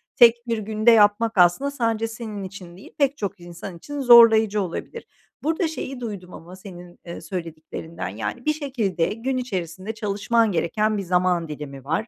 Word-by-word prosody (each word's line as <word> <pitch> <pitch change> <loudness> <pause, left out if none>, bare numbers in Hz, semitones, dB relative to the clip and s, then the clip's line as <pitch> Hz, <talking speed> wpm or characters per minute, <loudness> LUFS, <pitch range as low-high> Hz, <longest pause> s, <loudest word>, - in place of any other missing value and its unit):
tek 235 0 +5
bir 230 -1 0
günde 215 +2 +2
yapmak 220 0 +4
aslında 180 +11 +4
sadece 230 -4 -1
senin 220 -3 -7
için 185 -2 -10
değil, 195 - -14
pek 280 -1 +1
çok 200 -2 -4
insan 175 +1 -9
için 290 +11 -7
zorlayıcı 225 -4 +7
olabilir. 190 - -6 0.4
Burada 320 +3 0
şeyi 275 -4 -6
duydum 200 -6 -7
ama 175 +3 -11
senin, 180 -2 -12
eee, 170 - -8
söylediklerinden, 165 - -7
yani, 105 - -5
bir 305 - +2
şekilde 245 - -1
gün 255 +4 -3
içerisinde 190 -4 -4
çalışman 220 +1 0
gereken 210 +5 0
bir 200 - -3
zaman 180 -1 +1
dilimi 145 -3 -8
var. 165 - -2
205 Hz, 165 wpm, -23 LUFS, 175-230 Hz, 0.4 s, zorlayıcı